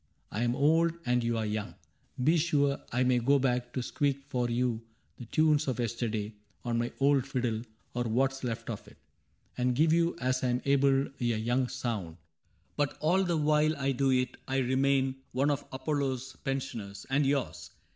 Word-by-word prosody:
I 105 Hz, -, -2 dB
am 120 Hz, 0 st, +1 dB
old. 160 Hz, +4 st, +3 dB
And 125 Hz, 0 st, +2 dB
you 115 Hz, 0 st, 0 dB
are 110 Hz, -, -1 dB
young. 105 Hz, 0 st, -3 dB, 0.5 s
Be 155 Hz, +5 st, +4 dB
sure, 145 Hz, -4 st, +2 dB
I 125 Hz, +2 st, +2 dB
may 125 Hz, -1 st, +3 dB
go 140 Hz, +4 st, +4 dB
back 125 Hz, -2 st, 0 dB
To 130 Hz, -, -2 dB
squeak 140 Hz, +1 st, -1 dB
for 125 Hz, -1 st, 0 dB
you 120 Hz, -1 st, 0 dB, 0.4 s
the 120 Hz, -, -8 dB
tunes 155 Hz, +3 st, +2 dB
of 130 Hz, -3 st, -1 dB
yesterday 115 Hz, -2 st, -2 dB, 0.3 s
On 120 Hz, -1 st, 0 dB
my 120 Hz, 0 st, -1 dB
old 140 Hz, -1 st, +3 dB
fiddle 120 Hz, -5 st, -1 dB, 0.2 s
— -, -, -40 dB
or 120 Hz, 0 st, -1 dB
what 130 Hz, +4 st, +2 dB
's 135 Hz, -, -9 dB
left 115 Hz, -3 st, -3 dB
of -, -, -7 dB
it -, -, -16 dB, 0.3 s
— -, -, -37 dB
And 125 Hz, 0 st, +2 dB
give 155 Hz, +4 st, +4 dB
you 170 Hz, 0 st, +2 dB
as 130 Hz, 0 st, 0 dB
I 125 Hz, -, +2 dB
'm 125 Hz, +1 st, 0 dB
able 140 Hz, -1 st, +3 dB
a -, -, -3 dB
young 120 Hz, +2 st, +1 dB
sound; 115 Hz, -10 st, -4 dB, 0.6 s
But 145 Hz, -1 st, 0 dB
all 180 Hz, +5 st, +3 dB
the 175 Hz, -3 st, 0 dB
while 155 Hz, 0 st, +2 dB
I 135 Hz, 0 st, 0 dB
do 135 Hz, +1 st, +1 dB
it 125 Hz, -1 st, +1 dB
I 135 Hz, -, 0 dB
remain 135 Hz, +1 st, +2 dB, 0.2 s
One 140 Hz, +4 st, +2 dB
of 145 Hz, -, -2 dB
Apollo's 130 Hz, -2 st, -2 dB
pensioners 125 Hz, -7 st, -4 dB
(and 145 Hz, +2 st, +3 dB
yours). 140 Hz, -1 st, -1 dB
130 Hz, 195 wpm, -30 LUFS, 120-140 Hz, 0.6 s, Be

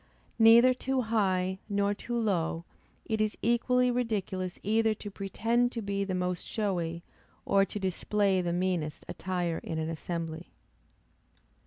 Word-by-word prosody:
Neither 230 Hz, +3 st, +8 dB
too 260 Hz, +1 st, -1 dB
high, 190 Hz, -5 st, 0 dB
nor 200 Hz, 0 st, +1 dB
too 240 Hz, +3 st, -4 dB
low; 175 Hz, -6 st, 0 dB, 0.4 s
it 220 Hz, -1 st, -1 dB
is 215 Hz, -1 st, 0 dB
equally 250 Hz, +2 st, +3 dB
ridiculous 200 Hz, -6 st, -2 dB
either 220 Hz, +1 st, +2 dB
to 205 Hz, -1 st, -8 dB
pretend 230 Hz, +5 st, 0 dB
to 230 Hz, -, -3 dB
be 200 Hz, 0 st, -1 dB
the 190 Hz, -2 st, -2 dB
most 180 Hz, -1 st, -2 dB
showy, 175 Hz, -6 st, -2 dB, 0.4 s
or 195 Hz, 0 st, +4 dB
to 210 Hz, -, -6 dB
display 195 Hz, 0 st, +1 dB
the 175 Hz, -1 st, -1 dB
meanest 175 Hz, -4 st, -1 dB
attire 180 Hz, -3 st, -2 dB
in 160 Hz, -, -5 dB
an 160 Hz, 0 st, -2 dB
assembly. 165 Hz, 0 st, -5 dB
200 Hz, 140 wpm, -29 LUFS, 180-225 Hz, 0.4 s, Neither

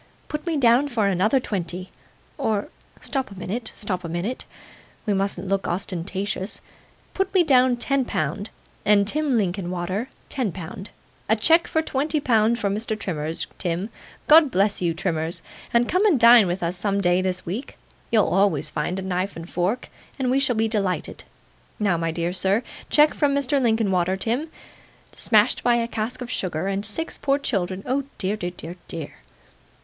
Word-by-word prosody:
'Put 300 Hz, +2 st, -4 dB
me 325 Hz, -2 st, +1 dB
down 250 Hz, +1 st, +4 dB
for 235 Hz, -6 st, 0 dB
another 200 Hz, +7 st, +3 dB
twenty 185 Hz, -5 st, -4 dB, 0.5 s
or 215 Hz, +4 st, 0 dB, 0.3 s
stop 265 Hz, -2 st, -2 dB
a 200 Hz, -, -11 dB
minute, 200 Hz, +6 st, -4 dB
stop 190 Hz, -3 st, -3 dB
a 170 Hz, -, -5 dB
minute. 175 Hz, +10 st, -3 dB, 0.6 s
We 210 Hz, -, +1 dB
mustn't 195 Hz, -1 st, -1 dB
look 195 Hz, 0 st, 0 dB
ostentatious; 190 Hz, +2 st, -3 dB, 0.5 s
put 385 Hz, 0 st, -1 dB
me 365 Hz, -, +6 dB
down 255 Hz, -5 st, +4 dB
ten 275 Hz, +2 st, +1 dB
pound, 165 Hz, +3 st, -2 dB, 0.3 s
and 205 Hz, -1 st, +4 dB
Tim 290 Hz, 0 st, +1 dB
Linkinwater 185 Hz, +2 st, -2 dB, 0.2 s
ten 250 Hz, -8 st, -2 dB
pound. 185 Hz, +2 st, -8 dB, 0.4 s
A 220 Hz, -, +5 dB
cheque 320 Hz, +10 st, +4 dB
for 320 Hz, -, 0 dB
twenty 300 Hz, +2 st, 0 dB
pound 230 Hz, -3 st, +3 dB
for 205 Hz, -, -1 dB
Mr. 215 Hz, +2 st, -2 dB
Trimmers, 160 Hz, -5 st, -3 dB
Tim. 180 Hz, +5 st, -2 dB, 0.4 s
God 310 Hz, -1 st, +8 dB
bless 200 Hz, -3 st, +1 dB
you, 170 Hz, -2 st, 0 dB
Trimmers 165 Hz, -2 st, -2 dB, 0.3 s
and 235 Hz, 0 st, +3 dB
come 370 Hz, +3 st, +2 dB
and 320 Hz, -11 st, +3 dB
dine 235 Hz, -3 st, +8 dB
with 175 Hz, +1 st, -2 dB
us 175 Hz, +2 st, -1 dB
some 200 Hz, 0 st, 0 dB
day 180 Hz, -1 st, +3 dB
this 185 Hz, -1 st, -2 dB
week; 205 Hz, +11 st, -5 dB, 0.3 s
you'll 220 Hz, -3 st, +4 dB
always 175 Hz, -7 st, +2 dB
find 180 Hz, -, -2 dB
a 190 Hz, -, -3 dB
knife 185 Hz, +1 st, -2 dB
and 165 Hz, 0 st, -8 dB
fork, 185 Hz, +8 st, -1 dB, 0.3 s
and 260 Hz, -2 st, 0 dB
we 265 Hz, -, +3 dB
shall 265 Hz, -3 st, +2 dB
be 220 Hz, +1 st, +2 dB
delighted. 195 Hz, -6 st, -2 dB, 0.5 s
Now, 200 Hz, -4 st, +2 dB
my 165 Hz, 0 st, -1 dB
dear 170 Hz, +2 st, -2 dB
sir 195 Hz, +5 st, +2 dB, 0.3 s
cheque 300 Hz, 0 st, +5 dB
from 285 Hz, -2 st, +1 dB
Mr. 280 Hz, 0 st, +1 dB
Linkinwater, 190 Hz, -6 st, +2 dB
Tim. 240 Hz, +11 st, -1 dB, 0.6 s
Smashed -, -, +2 dB
by 240 Hz, -1 st, +4 dB
a 230 Hz, -1 st, 0 dB
cask 235 Hz, +3 st, -4 dB
of 245 Hz, -, -7 dB
sugar, 175 Hz, -5 st, -2 dB
and 195 Hz, +1 st, -1 dB
six 220 Hz, +10 st, -4 dB
poor 275 Hz, 0 st, +2 dB
children 195 Hz, -8 st, -2 dB
oh 265 Hz, +2 st, 0 dB
dear, 195 Hz, +2 st, -1 dB
dear, 175 Hz, -3 st, -6 dB
dear! 160 Hz, -4 st, -6 dB
205 Hz, 170 wpm, -24 LUFS, 180-250 Hz, 0.6 s, God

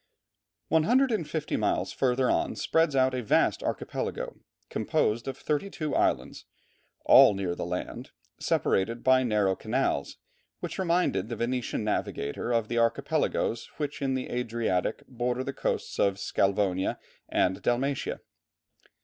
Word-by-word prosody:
One 160 Hz, -, +4 dB
hundred 260 Hz, +4 st, +4 dB
and 205 Hz, -9 st, -1 dB
fifty 160 Hz, -3 st, -2 dB
miles -, -, 0 dB
further 130 Hz, -1 st, +1 dB
on -, -, +1 dB
spreads 160 Hz, -3 st, +1 dB
out 130 Hz, 0 st, +3 dB
a 130 Hz, -, -1 dB
vast 110 Hz, -, +2 dB
archipelago -, -, -4 dB, 0.3 s
composed 115 Hz, +3 st, 0 dB
of 135 Hz, -, -4 dB
thirty 150 Hz, +6 st, -1 dB
two 155 Hz, -5 st, -4 dB
islands, -, -, 0 dB, 0.6 s
all 105 Hz, -, +8 dB
near 95 Hz, -3 st, -2 dB
the 85 Hz, -, -4 dB
land, 90 Hz, +1 st, -5 dB, 0.3 s
separated 115 Hz, +5 st, 0 dB
by 130 Hz, 0 st, +5 dB
narrow 105 Hz, -6 st, +2 dB
canals, 110 Hz, -, -1 dB, 0.4 s
which -, -, -5 dB
reminded 170 Hz, -, +1 dB
the 120 Hz, -, -3 dB
Venetian 120 Hz, -1 st, -2 dB
navigator 105 Hz, -1 st, -2 dB
of 115 Hz, -2 st, +1 dB
the 120 Hz, +1 st, 0 dB
archipelagos 115 Hz, 0 st, 0 dB
which 150 Hz, 0 st, -4 dB
in 135 Hz, -1 st, 0 dB
the 130 Hz, -, -4 dB
Adriatic 115 Hz, -6 st, -1 dB
border 125 Hz, 0 st, -2 dB
the 140 Hz, -, -4 dB
coasts -, -, -3 dB
of 100 Hz, -1 st, +3 dB
Sclavonia 95 Hz, -1 st, 0 dB, 0.3 s
and 95 Hz, +1 st, +1 dB
Dalmatia. 130 Hz, +3 st, -1 dB
120 Hz, 140 wpm, -28 LUFS, 105-135 Hz, 0.6 s, all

